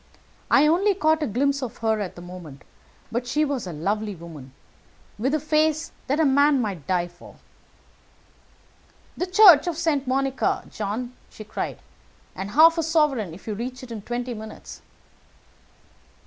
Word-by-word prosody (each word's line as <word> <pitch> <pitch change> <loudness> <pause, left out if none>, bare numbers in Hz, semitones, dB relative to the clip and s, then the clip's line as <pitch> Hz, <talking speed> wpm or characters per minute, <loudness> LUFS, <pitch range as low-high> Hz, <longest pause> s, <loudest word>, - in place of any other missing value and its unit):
I 280 - +5
only 375 +6 +3
caught 315 -3 +2
a 300 - 0
glimpse 275 +5 0
of 250 -4 -5
her 220 -1 0
at 200 -3 -5
the 175 - -10
moment, 175 -6 -11 0.5
but 240 +2 -2
she 300 +5 +1
was 275 -8 -3
a - - -5
lovely 205 +6 -2
woman, 160 -6 -11 0.7
with 265 +7 +1
a - - 0
face 310 +1 +1 0.2
that 280 +4 0
a 320 - +4
man 285 +1 +4
might 195 - -4
die 180 -2 +1
for. 175 0 -16 1.8
"'The 360 - -2
Church 365 -5 +7
of 340 -3 -2
St. 305 -5 0
Monica, 270 +1 0
John,' 220 +4 -4 0.2
she 215 - -11
cried; 210 - -5 0.6
'and 190 +1 -5
half 330 +7 +6
a - - +3
sovereign 300 - +1
if 185 - -15
you 215 - -3
reach 250 +4 -6
it 245 - -10
in 220 -2 -6
twenty 245 +3 -4
minutes.' 220 -1 -10
250 Hz, 160 wpm, -24 LUFS, 205-300 Hz, 1.8 s, Church